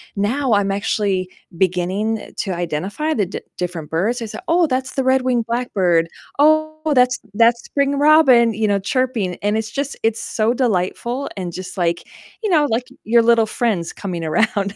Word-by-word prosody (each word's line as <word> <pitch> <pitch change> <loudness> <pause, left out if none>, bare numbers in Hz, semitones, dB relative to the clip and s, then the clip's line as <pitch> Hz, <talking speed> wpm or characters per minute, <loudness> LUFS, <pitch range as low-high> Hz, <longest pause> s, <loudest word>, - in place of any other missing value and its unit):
now, 235 +5 0
I'm 200 -1 +2
actually 195 -2 -1 0.3
beginning 190 +5 -1
to 195 - -4
identify 185 - -2
the 205 - +1
d 185 - -6 0.2
different 175 -4 -4
birds. 215 +10 -1
I - - -3
say, 215 - -7
"Oh, 340 0 +3
that's 260 -1 -2
the 270 - -1
red-winged 255 -2 +2
blackbird. 190 -9 +1 0.3
Oh, 310 +1 +2
that's 250 -1 +3
that's 230 +2 +3
spring 280 0 0
robin," 280 -6 +5
you 215 +1 0
know, 200 -1 +2
chirping, 220 -3 -1
and 205 +1 +1
it's 220 -1 -4
just, 280 0 -3
it's 225 0 0
so 220 +1 0
delightful, 240 +3 -1
and 185 -3 -4
just, 185 +3 -8
like, 170 -1 0 0.4
you 430 - 0
know, 300 -4 +4
like, 230 +2 0 0.2
your 230 +1 +4
little 230 -1 +4
friends 215 -7 -1
coming 180 -4 -5
around. 200 +4 0
225 Hz, 170 wpm, -19 LUFS, 190-255 Hz, 0.4 s, robin